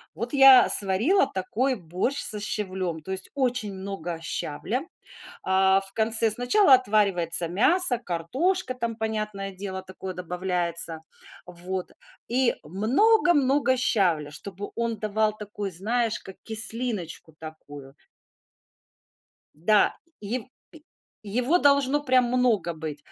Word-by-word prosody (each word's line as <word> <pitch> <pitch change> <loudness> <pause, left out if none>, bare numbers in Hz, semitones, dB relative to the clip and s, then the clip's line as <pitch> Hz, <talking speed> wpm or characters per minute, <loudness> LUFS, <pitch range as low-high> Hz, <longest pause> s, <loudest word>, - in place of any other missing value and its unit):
Вот 235 +1 -5
я 270 -2 +7
сварила 220 - +4
такой 230 +8 -2
борщ 185 - -3
со 210 - 0
щавлем, 185 -5 -3
то 190 - -9
есть 190 0 -3
очень 250 -6 -1
много 190 -3 -6
щавля, 190 - -4 0.6
а, 190 +1 +2
в 195 0 +1
конце. 225 +1 +5
Сначала 255 - +4
отваривается 195 -8 +2
мясо, 250 - +3
картошка 255 - -2
там, 235 -2 -4
понятное 215 -3 -4
дело, 190 0 -7
такое 185 0 -9
добавляется, 175 -2 -1 0.5
вот, 180 +1 -6 0.4
и 250 +1 +1
много-много 275 - +2
щавля, 180 - +1
чтобы 200 +6 -7
он 230 -2 -3
давал 215 0 -1
такую, 205 -1 -7
знаешь, 225 +6 -2
как 190 - -12
кислиночку 220 -7 -2
такую. 145 -3 -12 1.6
Да, 200 +7 +2 0.3
е 210 +4 -3
е - - -16 0.8
его 245 - 0
должно 280 -1 +2
прям 255 -2 +3
много 245 -3 +1
быть. 155 -2 -7
210 Hz, 115 wpm, -25 LUFS, 185-250 Hz, 1.6 s, я